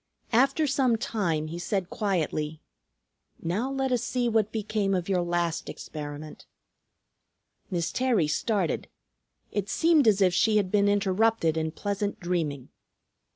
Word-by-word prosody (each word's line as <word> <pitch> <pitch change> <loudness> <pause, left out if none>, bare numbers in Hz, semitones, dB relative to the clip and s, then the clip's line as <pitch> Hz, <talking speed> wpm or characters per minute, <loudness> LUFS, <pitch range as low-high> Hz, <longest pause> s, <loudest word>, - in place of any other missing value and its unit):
After 275 +6 +4
some 260 -4 +2
time 180 -9 -1
he 165 +2 -6
said 185 0 -2
quietly, 160 -6 -1 0.8
"Now 210 +11 -2
let 270 -1 -1
us 245 -2 +1
see 245 0 0
what 220 -2 +1
became 210 -2 0
of 180 -2 -2
your 185 -2 +1
last 175 -1 -1
experiment." 150 0 -8 1.2
Miss 175 -4 -1
Terry 245 -11 +2
started. 190 +3 0 0.6
It 205 -1 -2
seemed 320 -5 +4
as 210 -2 +5
if 185 -3 +4
she 215 +4 +3
had 195 -3 0
been 205 -1 +3
interrupted 205 -3 +2
in 160 0 -1
pleasant 200 +4 -3
dreaming. 160 -7 -2
195 Hz, 135 wpm, -27 LUFS, 170-225 Hz, 1.2 s, as